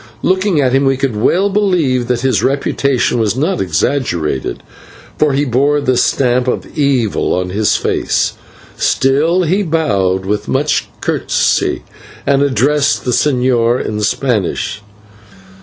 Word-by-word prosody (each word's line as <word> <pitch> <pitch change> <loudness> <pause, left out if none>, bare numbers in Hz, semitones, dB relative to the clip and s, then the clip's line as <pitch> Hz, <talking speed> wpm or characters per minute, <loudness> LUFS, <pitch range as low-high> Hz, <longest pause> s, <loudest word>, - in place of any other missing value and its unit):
Looking 185 -2 +1
at 130 -3 +1
him 135 +1 +3
we 135 -1 +2
could 135 -4 -1
well 175 - +2
believe 170 - +1
that 125 -1 -1
his 125 -6 +1
reputation 135 -2 0
was 110 -2 0
not 165 +8 0
exaggerated, 85 - -1 0.6
for 150 -2 +2
he 140 +2 +1
bore 140 +4 +1
the 130 -3 0
stamp 125 0 +1
of 125 - -3
evil 135 -7 0
on 90 0 -2
his 105 +1 +1
face. - - 0 0.4
Still 155 +7 +2
he 185 +5 +1
bowed 100 - 0
with 105 +1 -2
much 145 +3 0
courtesy - - 0 0.4
and 140 -1 +2
addressed 140 +2 +1
the 125 - 0
señor 125 -3 +1
in 105 0 -3
Spanish. 105 -3 -1
130 Hz, 135 wpm, -15 LUFS, 115-145 Hz, 0.6 s, him